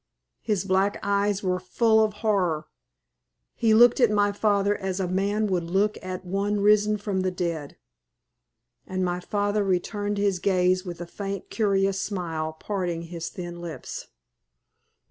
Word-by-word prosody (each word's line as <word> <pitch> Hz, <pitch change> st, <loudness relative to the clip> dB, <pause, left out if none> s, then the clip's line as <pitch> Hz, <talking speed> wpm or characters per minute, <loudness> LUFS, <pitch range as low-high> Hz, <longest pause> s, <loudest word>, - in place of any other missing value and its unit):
His 205 Hz, -4 st, -1 dB
black 195 Hz, +1 st, +2 dB
eyes 200 Hz, 0 st, +1 dB
were 180 Hz, -1 st, 0 dB
full 220 Hz, +1 st, +3 dB
of 215 Hz, -, +1 dB
horror; 180 Hz, -7 st, +1 dB, 0.9 s
he 225 Hz, -2 st, +3 dB
looked 240 Hz, +2 st, +6 dB
at 240 Hz, -4 st, +5 dB
my 205 Hz, -1 st, +2 dB
father 205 Hz, 0 st, +2 dB
as 190 Hz, -1 st, -3 dB
a 185 Hz, -, 0 dB
man 200 Hz, +4 st, 0 dB
would 180 Hz, -4 st, 0 dB
look 195 Hz, +5 st, +1 dB
at 185 Hz, 0 st, -6 dB
one 200 Hz, +3 st, -1 dB
risen 210 Hz, +1 st, +4 dB
from 200 Hz, -2 st, -2 dB
the 185 Hz, 0 st, +1 dB
dead. 170 Hz, -5 st, -4 dB, 1.1 s
And 185 Hz, 0 st, -1 dB
my 175 Hz, 0 st, -1 dB
father 205 Hz, +2 st, 0 dB
returned 205 Hz, +2 st, -1 dB
his 200 Hz, -2 st, +1 dB
gaze 185 Hz, -1 st, +2 dB
with 175 Hz, -2 st, -7 dB
a -, -, -4 dB
faint, 195 Hz, +2 st, -6 dB
curious 195 Hz, -3 st, +1 dB
smile 165 Hz, -5 st, -3 dB
parting 175 Hz, -1 st, -3 dB
his 170 Hz, 0 st, -6 dB
thin 175 Hz, -3 st, -7 dB
lips. 170 Hz, -3 st, -7 dB
195 Hz, 150 wpm, -26 LUFS, 180-205 Hz, 1.1 s, looked